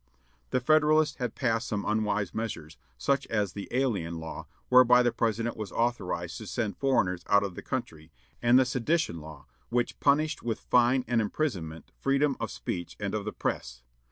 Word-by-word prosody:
The - - +1
Federalists 155 +2 +3
had 125 -4 -3
passed 115 -2 0
some 105 -1 -2
unwise 105 -2 0
measures, 85 -9 -5 0.2
such 140 0 0
as 105 -4 -1
the 100 - -6
"Alien 105 -11 -1
Law," 80 0 -7 0.2
whereby 125 -1 +6
the 120 - +2
President 115 +1 -1
was 105 -3 -6
authorized 90 -8 -2
to 110 - -8
send 110 -3 -2
foreigners 95 -10 +1
out 100 0 +4
of 100 -2 -3
the - - -8
country; 80 0 -5 0.3
and 120 +1 +5
the 130 - +5
"Sedition 130 - 0
Law," 75 -2 -11 0.2
which 120 0 -1
punished 150 +2 +2
with 115 -2 -2
fine 125 +1 +3
and 120 -2 +2
imprisonment 90 - -3
freedom 140 +1 +2
of 115 - -3
speech 85 -2 -5
and 100 -1 -3
of 105 -2 -2
the 105 - -2
press. - - -4
115 Hz, 175 wpm, -28 LUFS, 95-130 Hz, 0.3 s, whereby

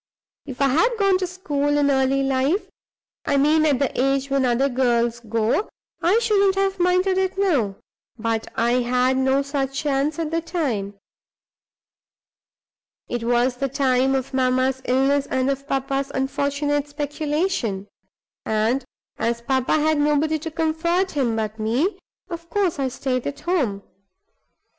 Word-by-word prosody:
"If 265 +1 -3
I 275 - +4
had 455 - +2
gone 395 -3 +3
to 370 - -1
school 290 -5 -1
in 285 -1 +3
early 270 0 +2
life 270 +8 0 0.6
I 285 - +2
mean 310 +3 +4
at 285 -3 +3
the 265 -1 -1
age 275 +1 0
when 275 -1 +2
other 250 +2 +2
girls 240 -2 +1
go 230 - 0 0.3
I 365 +6 +3
shouldn't 400 -4 +3
have 390 -1 0
minded 365 +1 +2
it 380 0 -1
now. 285 - +1 0.4
But 225 0 -2
I 240 +2 +2
had 250 +1 +1
no 265 +1 +2
such 275 -1 -3
chance 290 0 0
at 325 -2 -3
the 330 0 0
time. 265 - -2 2.1
It 240 -1 -3
was 245 +1 +2
the 275 +1 -1
time 265 0 +2
of 265 0 -3
mamma's 260 0 +1
illness 270 +2 +2
and 260 +1 0
of 275 +1 -5
papa's 275 0 -1
unfortunate 285 +2 -1
speculation; 290 - -2 0.6
and 220 +5 0 0.4
as 235 +1 -1
papa 260 0 0
had 310 0 +2
nobody 300 +1 +2
to 325 +2 -5
comfort 330 +3 0
him 255 -6 0
but 220 0 -3
me, 245 - 0 0.3
of 335 -2 -8
course 370 -4 0
I 270 - +1
stayed 255 -1 -2
at 285 - -6
home. 265 - -1
275 Hz, 150 wpm, -22 LUFS, 255-315 Hz, 2.1 s, I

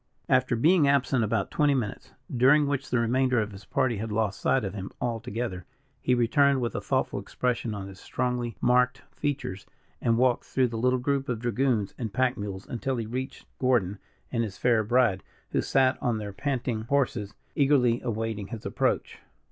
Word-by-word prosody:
After 130 -1 +3
being 155 +5 +4
absent 135 -3 +2
about 105 -2 -1
twenty 145 -2 +3
minutes, 110 -7 -4 0.2
during 135 +5 +5
which 140 -1 -2
the 125 - +1
remainder 125 +2 +2
of 105 -1 -2
his 95 0 -11
party 120 +1 0
had 110 +2 -4
lost 105 -2 0
sight 135 - +2
of 95 - -4
him 95 -2 -5
altogether, 115 -4 -3 0.4
he 125 - +2
returned 140 +3 +3
with 120 -2 -2
a - - -3
thoughtful - - 0
expression 120 -3 -2
on 95 -1 -6
his 95 -1 -11
strongly 125 -4 -2
marked 125 +1 +3
features, 140 -10 -3 0.3
and 115 -1 +2
walked 125 0 +2
through 130 -2 +1
the 115 - -6
little 125 +2 +3
group 135 +1 -1
of 125 - 0
dragoons 120 -3 0
and 110 -5 -4
pack 130 0 +2
mules, 100 -2 -6
until 130 +1 -2
he 115 - -2
reached 130 +4 -5
Gordon 105 -7 +1 0.3
and 115 -2 0
his 105 -4 -5
fair 115 -3 +3
bride, 115 -4 +2 0.3
who - - +1
sat 130 0 +2
on 120 -5 0
their 105 -2 -5
panting 125 -1 -2
horses, 120 -6 0 0.2
eagerly 135 -5 +3
awaiting 110 -3 -3
his 115 -1 -8
approach. - - -1
120 Hz, 180 wpm, -27 LUFS, 110-130 Hz, 0.4 s, during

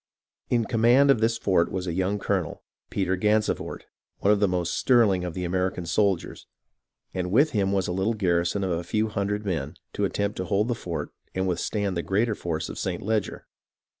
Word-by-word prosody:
In 120 -2 +2
command 120 +6 +5
of 135 - +3
this 115 +1 +2
fort 95 -6 +2
was 95 -1 -3
a 85 - -2
young 95 +3 0
colonel, 95 -5 -2 0.3
Peter 95 -1 0
Gansevoort, 105 +3 0 0.3
one 100 - +3
of 105 - +1
the 100 - +3
most 90 -2 -1
sterling 110 -8 +3
of 90 -2 -4
the 90 - -3
American 90 0 -1
soldiers; 95 +1 0 0.7
and 90 -1 -2
with 140 +8 +4
him 100 -5 +1
was 95 -2 +1
a - - -2
little 95 +5 0
garrison 90 0 +1
of 95 - -1
a 85 0 -1
few 110 +5 0
hun 100 -1 -1
dred 105 +1 -2
men 80 -4 -2 0.2
to - - -2
attempt 100 0 -2
to 95 - -2
hold 105 +5 +1
the - - +2
fort 90 -7 -5 0.2
and 95 0 0
withstand 95 +2 -1
the 85 - 0
greater 105 +6 +1
force 80 -5 -3
of - - -7
St. - - -3
Leger. 110 0 -1
95 Hz, 200 wpm, -26 LUFS, 90-105 Hz, 0.7 s, command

